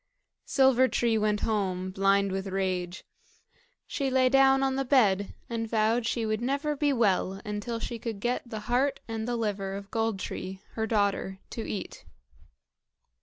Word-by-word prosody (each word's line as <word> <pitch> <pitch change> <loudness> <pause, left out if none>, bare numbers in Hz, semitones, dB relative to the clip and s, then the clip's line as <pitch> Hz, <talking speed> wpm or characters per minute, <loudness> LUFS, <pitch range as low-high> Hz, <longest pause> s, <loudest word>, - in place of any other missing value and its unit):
Silver 265 -1 +4
tree 235 -3 +1
went 210 -1 +1
home, 185 -4 -1
blind 195 +1 +2
with 190 +1 -3
rage. 185 -2 -2 0.8
She 275 -2 -2
lay 255 -1 +3
down 270 0 +5
on 265 -1 +1
the 270 - 0
bed, 210 -8 +3
and 225 -1 -3
vowed 225 +1 +2
she 230 -1 -1
would 215 0 -1
never 280 +4 0
be 290 0 +1
well 195 -6 +1
until 210 +2 -3
she 230 0 -5
could 225 -3 -5
get 240 +4 0
the 220 -2 -5
heart 255 +5 +1
and 225 0 -4
the 245 - -1
liver 200 -4 -2
of 200 0 -8
Gold 225 -2 0
tree, 190 0 -5
her 220 -1 -2
daughter, 200 -3 0
to 225 - -5
eat. 205 - -5
220 Hz, 165 wpm, -28 LUFS, 195-245 Hz, 0.8 s, down